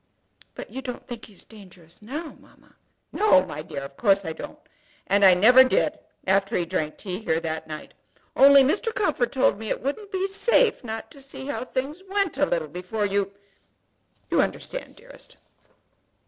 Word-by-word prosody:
"But - - -9
you 265 - -5
don't 250 -2 -7
think 235 -2 -8
he 210 - -17
is - - -13
dangerous 185 -5 -16
now, 295 +9 -6
mamma?" - - -23 0.4
"No, 300 - +4
my 150 -4 -6
dear; 140 -2 -7
of 140 0 -10
course 200 -3 +3
I 160 - -3
don't. - - -9 0.5
And 200 0 +2
I 190 -2 +8
never 245 +8 +7
did 255 - +1 0.3
after 195 +3 +2
he 175 - 0
drank 155 -2 -3
tea 185 -2 -5
here 165 -7 0
that 160 -1 -4
night; 155 -1 -8 0.4
only 275 0 +8
Mr. 415 - 0
Comfort 310 - 0
told 265 -5 +2
me 220 -1 -6
it - - -3
wouldn't 400 +10 -4
be 380 -1 -1
safe 440 - +2
not 225 -1 -6
to 280 - -14
see 270 0 -10
how 280 -2 -4
things 275 +7 -4
went 390 -8 -1
a 290 - +3
little 165 -3 -1
before 185 +7 -3
you, 200 0 0 1.0
you - - +4
understand, - - -4
dearest?" - - -16
225 Hz, 180 wpm, -25 LUFS, 185-285 Hz, 1.0 s, I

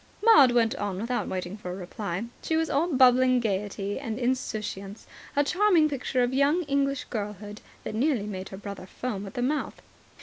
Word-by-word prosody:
Maud 295 - +7
went 230 -1 +3
on 200 -2 -3
without 240 +3 -2
waiting 185 0 -4
for 205 -4 -8
a 180 - -4
reply. 195 +1 -4 0.2
She 320 - 0
was 320 0 0
all 295 +5 +2
bubbling 255 -1 +5
gaiety 205 -1 -2
and 225 -5 -4
insouciance, 215 -5 -3 0.3
a 285 - +4
charming 360 0 +3
picture 260 -3 -1
of 245 +1 0
young 285 +6 +3
English 275 -2 0
girlhood 210 -1 -5 0.2
that - - -5
nearly 240 -2 +1
made 190 -2 -6
her 190 - -8
brother 200 -2 -8
foam 205 -3 -5
at 195 - -11
the 245 - -1
mouth. 295 +4 -2
240 Hz, 180 wpm, -27 LUFS, 205-275 Hz, 0.3 s, Maud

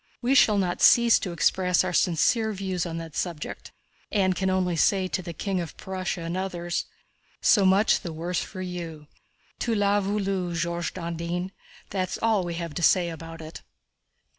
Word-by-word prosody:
We 255 +2 +1
shall 215 -6 +5
not 180 -3 -1
cease 235 -1 +6
to 185 - -4
express 180 +3 +2
our 185 -1 -2
sincere 215 +7 +2
views 185 -3 -2
on 165 -1 -5
that 165 -2 -7
subject, 170 -4 -4 0.4
and 190 -3 +2
can 190 +1 0
only 185 -2 +1
say 190 +3 +2
to 185 - -2
the 170 -1 -6
King 190 +3 -2
of 170 - -8
Prussia 185 -2 -4
and 165 +1 -4
others: 175 -2 -2 0.5
'So 200 -3 +4
much 195 +3 +4
the 170 - -6
worse 170 +2 -2
for 185 -2 -6
you. 170 -4 -6 0.5
Tu 230 -2 0
l'as 205 0 +2
voulu, 195 -3 -1
George 170 0 -2
Dandin,' 170 +1 -3 0.4
that's 185 -2 -2
all 220 -4 +2
we 170 -1 -4
have 170 -2 -5
to 175 - -4
say 175 0 +3
about 165 0 -9
it!" 160 +1 -9
180 Hz, 175 wpm, -26 LUFS, 170-195 Hz, 0.5 s, cease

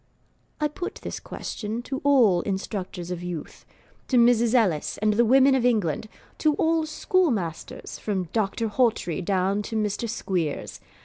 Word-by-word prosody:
I 300 - +2
put 350 +5 -6
this - - -5
question 220 +2 -5
to 265 +1 -4
all 240 -11 +5
instructors 190 -2 -4
of 175 -1 -4
youth 175 -3 -7 0.4
to 255 - +2
Mrs. 235 0 +4
Ellis 185 -11 +1
and 215 0 +2
the 235 +3 +4
Women 265 +3 +5
of 260 -2 +2
England; 215 -5 +1 0.3
to 305 -2 +3
all 320 0 +1
schoolmasters, 265 - -1
from 190 -4 -2
Doctor 220 +1 0
Hawtrey 210 -7 0
down 190 +2 0
to 225 +2 -6
Mr. 215 +2 -1
Squeers. 180 -9 -3
215 Hz, 145 wpm, -25 LUFS, 190-250 Hz, 0.4 s, all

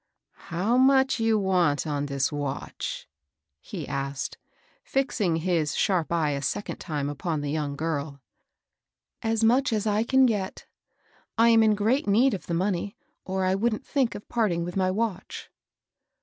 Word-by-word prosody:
How 195 +9 +1
much 265 0 +4
you 225 -1 +2
vant 180 -7 +2
on 145 -2 -2
dis 140 0 0
vatch? 145 -2 -4 0.3
" 75 +2 -59
he - - -7
asked, 140 0 -4 0.4
fixing 230 -10 0
his 165 -3 0
sharp 180 -5 +1
eye 160 -3 +1
a 140 -1 -2
second 175 +9 -3
time 150 -4 -3
upon 145 +2 -3
the 145 -1 -3
young 150 -2 -2
girl. 155 -1 -2
^^ 140 - -21 1.0
As 225 0 0
much 255 +4 +3
as 215 -2 0
I 210 +1 +2
can 265 +2 +4
get. 205 -6 -2 0.7
I 230 +1 +6
am 225 -1 +6
in 215 -1 +4
great 220 +5 +1
need 235 +7 +4
of 185 -5 -5
the 170 - -1
money, 190 +2 -1 0.3
or 190 0 -1
I 185 - +2
wouldn't 215 +3 0
think 270 -5 0
of 205 - -9
parting 200 -8 0
with 175 +1 -5
my 185 -1 +2
watch." 200 -1 -3
185 Hz, 165 wpm, -26 LUFS, 150-225 Hz, 1.0 s, I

